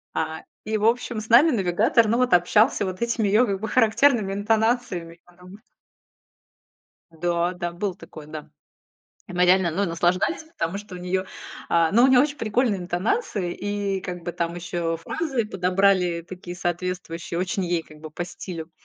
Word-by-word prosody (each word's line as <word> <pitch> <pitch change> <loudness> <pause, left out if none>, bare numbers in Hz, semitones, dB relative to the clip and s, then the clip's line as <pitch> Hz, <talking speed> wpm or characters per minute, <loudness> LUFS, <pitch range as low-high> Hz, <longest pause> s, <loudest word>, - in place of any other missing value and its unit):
А, 160 0 -3 0.2
и, 215 +1 -1
в 210 - -1
общем, 235 0 +1
с 215 - -11
нами 250 +8 +7
навигатор, 215 +2 +2
ну 230 +2 +2
вот 250 -1 +2
общался 205 +6 +3
вот 185 +1 -5
этими 235 -2 0
её 215 +5 +4
как 195 -2 -2
бы 220 - -4
характерными 225 -2 +3
интонациями 210 -5 0
потом. 180 +4 -15 1.5
Да, 170 +2 -1
да, 175 -1 -4
было 180 +1 -3
такое, 155 -5 -12
да. 155 0 -8 0.8
И - - -8
мы 180 0 +3
реально, 180 -1 +4
ну, 190 +5 0
наслаждались, 175 - 0 0.2
потому 165 +4 -1
что 205 -3 -9
у - - -8
неё, 180 +1 -2 0.4
а, 165 -1 +2
ну, 235 +4 +5
у - - +8
неё 260 -1 +6
очень 290 0 -2
прикольные 220 -3 0
интонации, 180 - -1
и 205 -1 -2
как 180 -2 -6
бы 175 - -3
там 170 0 -2
ещё 170 -1 -2
фразы 265 - -2
подобрали 185 -3 +1
такие 180 0 -9
соответствующие, 175 -1 -3
очень 190 +2 -1
ей 175 -1 0
как 155 -1 -16
бы 155 0 -9
по 175 +3 -4
стилю. 170 -2 -8
185 Hz, 170 wpm, -24 LUFS, 175-215 Hz, 1.5 s, у